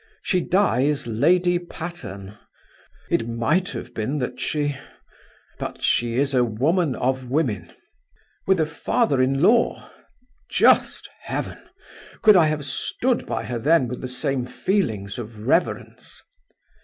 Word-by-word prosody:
She 185 -2 +1
dies 150 - +1
Lady 175 +10 +2
Patterne! 165 - -8 0.8
It 115 - +1
might 120 +11 0
have 120 0 -7
been 120 +7 -2
that 125 -2 -4
she... 145 -2 -1 0.8
But - - -6
she 120 -1 +1
is 140 +2 +1
a 125 -2 +4
woman 140 - +1
of 130 0 -1
women! 115 - -1 0.8
With 190 -2 +3
a 160 - +3
father 160 - 0
in 135 +3 +1
law! 230 +5 +2 0.6
Just - - +3
heaven! - - -5 0.6
Could 215 -2 +8
I 170 -4 +6
have 150 -2 -2
stood 245 - -1
by 110 - -2
her 115 +2 -4
then 145 +1 +3
with 125 +1 -6
the 130 - -4
same 130 +1 -2
feelings 125 - -2
of 110 -2 -8
reverence? 165 +7 -1
135 Hz, 130 wpm, -23 LUFS, 120-170 Hz, 0.8 s, Could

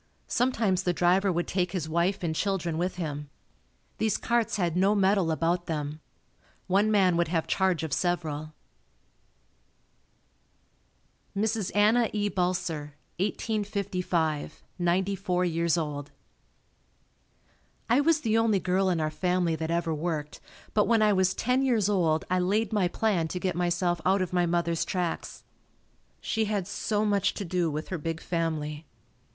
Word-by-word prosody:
Sometimes 225 -7 +1
the 180 -1 0
driver 185 +3 +3
would 175 0 -1
take 180 -1 -1
his 170 -5 -2
wife 170 +4 0
and 165 -2 0
children 175 -2 -1
with 180 +2 -1
him. 150 -4 -4 0.7
These 220 -1 +1
carts 235 -1 0
had 175 -4 0
no 195 +3 +3
metal 195 -3 +3
about 170 +2 0
them. 150 -1 -3 0.7
One 200 +3 +2
man 190 -5 +3
would 170 - +2
have 165 -1 0
charge 185 -5 +1
of 155 -3 -3
several. 155 -4 -2 2.8
Mrs. 215 -1 0
Anna 220 +3 +4
E. 205 -1 0
Balser 170 -5 -2 0.3
1855, 190 -7 -2 0.2
Ninety 185 +3 +1
four 180 -2 0
years 170 0 +1
old. 150 -3 -3 1.8
I 245 +5 +4
was 320 0 +3
the 225 -3 +2
only 220 -3 +3
girl 185 +1 +1
in 175 -3 +1
our 155 -1 -1
family 180 -1 0
that 160 0 -3
ever 170 -1 0
worked, 155 -1 -3 0.3
but 210 - +3
when 225 -2 +4
I 210 -1 +4
was 185 -1 +2
ten 250 +2 +1
years 230 -7 +2
old 165 -6 +1
I 185 0 +1
laid 210 +5 0
my 200 -4 +2
plan 180 -3 0
to 180 - -4
get 185 -1 -1
myself 175 -1 0
out 190 +1 +3
of 180 - -6
my 175 -1 +2
mother's 170 -1 0
tracks. 180 -3 -3 0.8
She 220 -1 -1
had 205 -3 -1
so 210 0 -1
much 200 -2 +1
to 200 - -4
do 175 -1 0
with 155 +1 -4
her 185 - -3
big 165 +1 -3
family. 160 -3 -3
180 Hz, 150 wpm, -28 LUFS, 165-200 Hz, 2.8 s, Anna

